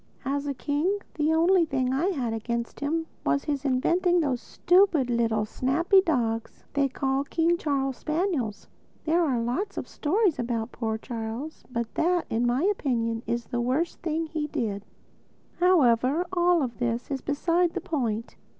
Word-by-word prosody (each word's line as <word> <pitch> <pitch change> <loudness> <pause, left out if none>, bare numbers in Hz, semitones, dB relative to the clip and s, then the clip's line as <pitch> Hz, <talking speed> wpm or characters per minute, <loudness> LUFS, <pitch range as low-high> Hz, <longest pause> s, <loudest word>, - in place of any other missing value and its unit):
As 280 +1 -1
a 280 - -2
king, 300 +10 0 0.2
the 305 0 +1
only 340 +3 +4
thing 260 -4 0
I 295 +7 +1
had 260 - -1
against 235 +1 -3
him 320 +3 -1 0.2
was 140 0 +1
his 285 -1 -2
inventing 345 +7 +2
those 270 -7 0
stupid, 350 -8 +3
little, 225 -2 +1
snappy 315 - +3
dogs 235 - -1
they 280 -1 +2
call 270 +1 0
King 330 +3 +1
Charles 270 -5 -1
Spaniels. 305 - -2 0.4
There 335 +2 +3
are 265 -7 +1
lots 250 - -2
of - - -4
stories 360 +1 +1
told 245 -1 -3
about 230 0 -2
poor 220 -2 -2
Charles; 230 +6 -6
but 235 -2 -3
that, 350 +1 +1
in 235 +2 +1
my 250 +5 +1
opinion, 240 - 0
is 235 -1 -1
the 240 - -2
worst 270 +8 -1
thing 325 0 -1
he 310 -1 -3
did. 205 -7 -3 0.7
However, 295 -3 +4
all 345 -5 +3
this 240 +1 -3
is 270 -2 -2
beside 335 +4 +1
the 365 - -2
point. 245 - -2
275 Hz, 160 wpm, -26 LUFS, 235-335 Hz, 0.7 s, only